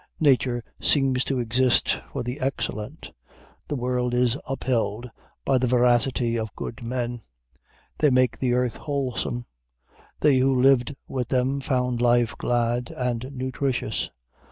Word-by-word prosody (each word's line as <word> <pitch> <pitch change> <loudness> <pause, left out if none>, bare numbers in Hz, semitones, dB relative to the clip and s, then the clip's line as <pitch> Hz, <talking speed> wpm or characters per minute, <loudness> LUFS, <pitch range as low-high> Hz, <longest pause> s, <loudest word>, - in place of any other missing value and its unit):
Nature 130 -5 +3 0.2
seems 135 -3 +2
to 135 - -1
exist 125 +1 +2
for - - -3
the 125 +4 -4
excellent. 135 -1 -4 0.6
The 145 - -2
world 125 -1 -1
is 125 -1 +3
upheld 120 -3 -1 0.4
by 135 -2 +3
the 125 - +1
veracity 120 -1 +2
of 110 -2 -5
good 115 0 -6
men: 120 -1 -3 0.8
they 150 - +5
make 130 -1 +2
the 125 -2 +1
earth 125 -1 0
wholesome. 130 -4 -2 0.7
They 145 -3 +4
who 130 0 +3
lived 135 0 +4
with 125 -3 -3
them 130 +2 +1
found 125 -3 0
life 120 -1 +3
glad 120 0 0
and 125 0 -2
nutritious. 130 -3 -2
125 Hz, 130 wpm, -25 LUFS, 120-130 Hz, 0.8 s, they